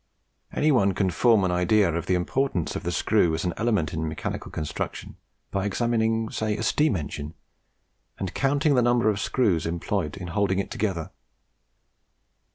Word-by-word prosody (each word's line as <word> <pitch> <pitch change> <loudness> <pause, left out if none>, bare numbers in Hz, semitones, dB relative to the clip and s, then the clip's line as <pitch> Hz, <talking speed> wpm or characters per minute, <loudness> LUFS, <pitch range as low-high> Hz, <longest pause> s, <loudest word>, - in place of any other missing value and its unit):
Any 155 - +2
one 100 -8 +3
can 95 -3 +1
form 115 +2 +4
an 90 - +1
idea 90 +1 +3
of 85 0 -3
the 90 - +2
importance 90 - -1
of - - -3
the - - -2
screw 80 -2 +2
as 80 - -3
an 90 - 0
element 105 -10 0
in 80 0 -2
mechanical 75 - -5
construction 75 -2 -5 0.4
by 95 -1 -1
examining 115 +1 0
say 110 -1 -1
a 110 - -3
steam 150 +1 +2
engine, 75 -1 -5 0.8
and 95 -2 -4
counting 145 +2 +2
the 125 - +4
number 120 -2 +3
of 100 - -3
screws 100 -12 +1
employed 85 -1 -2
in 90 -3 -6
holding 95 +2 +1
it 100 - -2
together. 95 -7 -2
100 Hz, 165 wpm, -25 LUFS, 85-115 Hz, 0.8 s, form